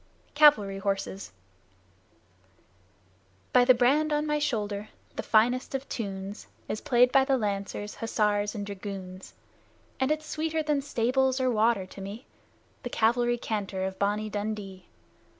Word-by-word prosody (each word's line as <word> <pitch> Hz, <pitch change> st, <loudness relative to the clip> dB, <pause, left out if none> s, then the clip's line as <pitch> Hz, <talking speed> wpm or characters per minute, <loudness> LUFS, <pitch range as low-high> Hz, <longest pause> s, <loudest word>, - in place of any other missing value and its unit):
CAVALRY 215 Hz, -10 st, +5 dB
HORSES 100 Hz, -, -3 dB, 2.2 s
By 250 Hz, -, +7 dB
the 255 Hz, 0 st, +6 dB
brand 285 Hz, +6 st, +3 dB
on 295 Hz, 0 st, +1 dB
my 300 Hz, 0 st, 0 dB
shoulder, 210 Hz, -7 st, -2 dB, 0.3 s
the -, -, -2 dB
finest 245 Hz, +5 st, +2 dB
of 270 Hz, +1 st, -4 dB
tunes 195 Hz, -2 st, -5 dB, 0.2 s
Is 215 Hz, -, -3 dB
played 245 Hz, 0 st, +4 dB
by 270 Hz, 0 st, +5 dB
the 270 Hz, 0 st, +2 dB
Lancers, 205 Hz, -1 st, -3 dB
Hussars, 210 Hz, -1 st, 0 dB
and 205 Hz, -1 st, -4 dB
Dragoons, 195 Hz, -2 st, -8 dB, 0.6 s
And 265 Hz, +1 st, +1 dB
it's 310 Hz, 0 st, -1 dB
sweeter 315 Hz, +1 st, -2 dB
than 300 Hz, -2 st, +1 dB
"Stables" 260 Hz, 0 st, +1 dB
or 255 Hz, -1 st, +2 dB
"Water" 220 Hz, -3 st, +2 dB
to 190 Hz, +1 st, -11 dB
me 205 Hz, +6 st, -7 dB, 0.6 s
The 245 Hz, -, -5 dB
Cavalry 240 Hz, +1 st, +2 dB
Canter 205 Hz, -5 st, -3 dB
of 190 Hz, 0 st, -5 dB
"Bonnie 210 Hz, +1 st, 0 dB
Dundee"! 205 Hz, -3 st, -5 dB
220 Hz, 135 wpm, -28 LUFS, 200-260 Hz, 2.2 s, By